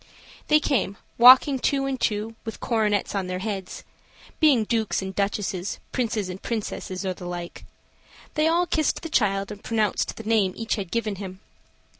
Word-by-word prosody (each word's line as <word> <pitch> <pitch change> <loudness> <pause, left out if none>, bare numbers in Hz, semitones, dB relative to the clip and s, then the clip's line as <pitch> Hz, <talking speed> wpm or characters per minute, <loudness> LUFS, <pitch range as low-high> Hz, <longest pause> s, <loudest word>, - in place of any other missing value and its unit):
They 305 - +5
came, 225 -9 0 0.2
walking 260 +3 +8
two 275 +1 +1
and 270 -1 -3
two, 215 +1 -1
with 225 - -5
their - - -9
coronets 210 -4 +1
on 195 -2 -2
their 180 0 -3
heads 190 -1 -5 0.6
being 285 -8 +5
dukes 220 -3 0
and 190 0 -5
duchesses, 200 -1 -2
princes 220 -5 -1
and 185 +1 -7
princesses, 205 -4 -4
or 185 - -1
the 180 0 -9
like; 175 -1 -7 0.7
they 305 0 +2
all 340 +2 +3
kissed 315 -3 0
the 330 - -5
child 195 -7 +1
and 205 -1 -9
pronounced 220 -3 0
the 225 - -7
name 215 -4 +2
each 225 -1 -2
had 195 -5 -3
given 215 -2 -2
him. 190 -1 -7
215 Hz, 175 wpm, -25 LUFS, 195-245 Hz, 0.7 s, walking